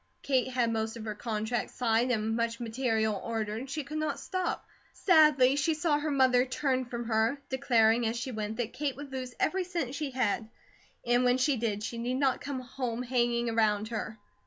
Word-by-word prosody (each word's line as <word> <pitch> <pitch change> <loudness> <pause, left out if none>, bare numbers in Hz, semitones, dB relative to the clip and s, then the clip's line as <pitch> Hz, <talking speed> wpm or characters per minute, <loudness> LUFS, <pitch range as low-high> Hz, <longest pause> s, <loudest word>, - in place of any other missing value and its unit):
Kate 260 -3 +2
had 245 -3 0
most 220 +1 -2
of 225 - -7
her 215 - -3
contracts 220 +2 -3
signed 235 0 +2
and 220 -1 0
much 230 0 -1
material 225 -3 0
ordered, 225 +2 -3
she 300 +2 -3
could 305 +3 -5
not 310 - -2
stop. 370 -2 -3 0.3
Sadly 300 -7 +5
she 300 +3 +1
saw 300 -1 +1
her 305 +1 -2
mother 260 -3 +4
turn 260 0 -1
from 240 -1 -5
her, 225 +4 +1
declaring 235 -4 +3
as 225 +2 -2
she 250 +2 -4
went 215 -1 -4
that 240 -2 -3
Kate 285 -2 -2
would 285 0 -9
lose 255 -1 -5
every 380 0 +1
cent 340 -8 -3
she 290 0 -3
had, 235 -4 -1 0.6
and 240 +1 +3
when 250 0 +4
she 270 +2 +2
did 215 -3 -2
she 230 +2 -4
need 245 +2 -1
not 270 -2 +1
come 280 -2 -4 0.4
hanging 240 -1 +1
around 215 -1 +1
her. 220 -1 -4
245 Hz, 190 wpm, -30 LUFS, 225-275 Hz, 0.6 s, Sadly